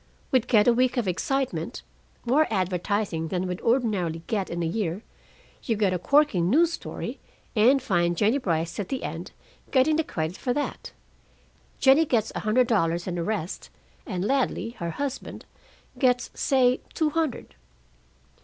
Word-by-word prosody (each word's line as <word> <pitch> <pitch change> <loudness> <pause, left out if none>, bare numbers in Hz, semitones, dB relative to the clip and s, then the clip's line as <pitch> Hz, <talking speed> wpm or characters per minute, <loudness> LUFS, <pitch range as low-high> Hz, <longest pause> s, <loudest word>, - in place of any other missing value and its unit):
We'd 255 -2 +2
get 215 -3 +4
a 240 - +6
week 255 +2 +1
of 235 -5 0
excitement, 260 +10 -2 0.4
more 285 +6 +3
advertising 185 -2 -1
than 180 +1 -2
we'd 180 -1 -4
ordinarily 205 -10 0
get 200 -4 -2
in 170 0 -3
a - - 0
year; 180 +2 -2 0.6
you 230 - -1
get 205 -3 +1
a 180 - -1
corking 225 - +3
news 330 - +4
story, - - -6 0.4
and 245 +6 +5
find 175 -8 0
Jennie 220 +9 +2
Brice 170 - -2
at 195 - -3
the 265 -1 -3
end, - - -5 0.4
getting 285 +4 +3
the 320 - +2
credit 160 - -4
for 250 - -1
that. 290 - -4 0.9
Jennie 275 +4 +5
gets 230 -6 0
a - - -3
hundred 225 +4 +2
dollars 175 -7 +1
and 175 -2 -3
a - - -1
rest, 195 -3 -4 0.4
and 185 -5 -2
Ladley, 260 -2 0
her 170 - -3
husband, 275 - -5 0.5
gets, 250 -3 +2
say, 255 -2 +2
two 310 -2 +1
hundred.' 320 -4 -2
220 Hz, 160 wpm, -26 LUFS, 180-260 Hz, 0.9 s, a